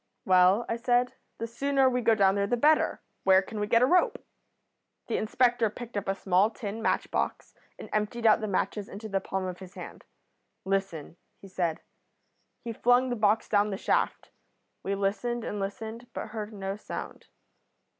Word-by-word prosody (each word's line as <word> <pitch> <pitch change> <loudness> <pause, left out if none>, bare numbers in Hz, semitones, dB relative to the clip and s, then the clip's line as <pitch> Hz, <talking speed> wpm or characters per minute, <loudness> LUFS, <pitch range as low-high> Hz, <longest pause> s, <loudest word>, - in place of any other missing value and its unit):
"'Well,' 185 +4 +5
I 230 - -1
said, 245 +1 +1 0.2
'the 230 - -3
sooner 270 +3 +1
we 250 -1 +1
go 225 -1 +4
down 195 -2 +4
there 200 0 0
the 245 - +1
better. 300 +5 +3 0.2
Where 190 0 +5
can 215 +2 -7
we 210 - -1
get 230 +3 +4
a - - +7
rope?' 415 - +3 0.9
"The - - -1
inspector 240 +1 +2
picked 235 +2 -9
up 205 -1 -3
a 195 - 0
small 190 +2 +2
tin 220 -1 -6
match - - 0
box - - -2 0.2
and - - -9
emptied 215 +2 -1
out 220 0 +5
the 215 - -2
matches 200 +1 -2
into 210 +3 -7
the 195 -2 -1
palm 190 0 -3
of 180 -1 -5
his 190 -1 -12
hand. - - -10 0.6
'Listen,' 190 -5 -2 0.2
he 195 - -12
said. 175 -4 -2 0.8
He 230 - -4
flung 245 +3 +3
the - - 0
box 215 0 +2
down 205 0 +2
the 195 - -3
shaft. - - -1 0.5
We 200 - -2
listened, 220 +4 -1
and 205 - -4
listened, 220 +4 -5
but - - -5
heard 215 -1 -5
no 195 -1 -5
sound. - - -7
215 Hz, 185 wpm, -28 LUFS, 195-235 Hz, 0.9 s, a